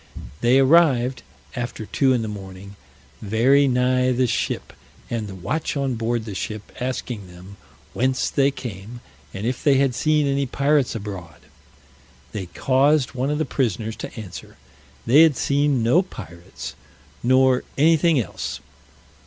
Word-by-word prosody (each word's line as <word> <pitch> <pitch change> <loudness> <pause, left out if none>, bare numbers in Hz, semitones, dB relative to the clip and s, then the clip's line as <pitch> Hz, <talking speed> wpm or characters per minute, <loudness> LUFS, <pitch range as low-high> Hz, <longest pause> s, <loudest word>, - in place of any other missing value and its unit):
They 120 +2 +4
arrived, 135 -3 +4 0.3
after 120 -3 -4
two 135 +5 +2
in 120 -3 +1
the - - -3
morning, 100 -1 -9 0.5
very 125 +7 +3
nigh 125 0 +2
the 125 +1 +2
ship; 120 - -2 0.4
and 115 -3 -2
the 95 - -8
watch 105 - -3
on 135 -2 0
board 115 0 -2
the 105 - -6
ship 105 +2 -6
asking 125 -5 -4
them, 90 +3 -13 0.4
whence 130 +1 0
they 140 0 +3
came, 120 -3 -8 0.3
and 100 +3 -6
if 125 +1 -2
they 145 -3 +4
had 135 -2 +2
seen 150 +5 +2
any 140 0 0
pirates 140 0 +1
abroad. 100 -5 -7 0.9
They 100 -4 -5
caused 135 - +2
one 130 +2 -1
of 150 - 0
the 155 - 0
prisoners 115 -4 -2
to 115 - -7
answer, 100 -5 -10 0.5
they 135 +7 +6
had 160 -4 +5
seen 140 -3 +1
no 125 +10 +4
pirates, 90 - -9 0.5
nor 130 +1 +3
anything 160 +1 +4
else. 105 - -4
125 Hz, 145 wpm, -22 LUFS, 110-140 Hz, 0.9 s, they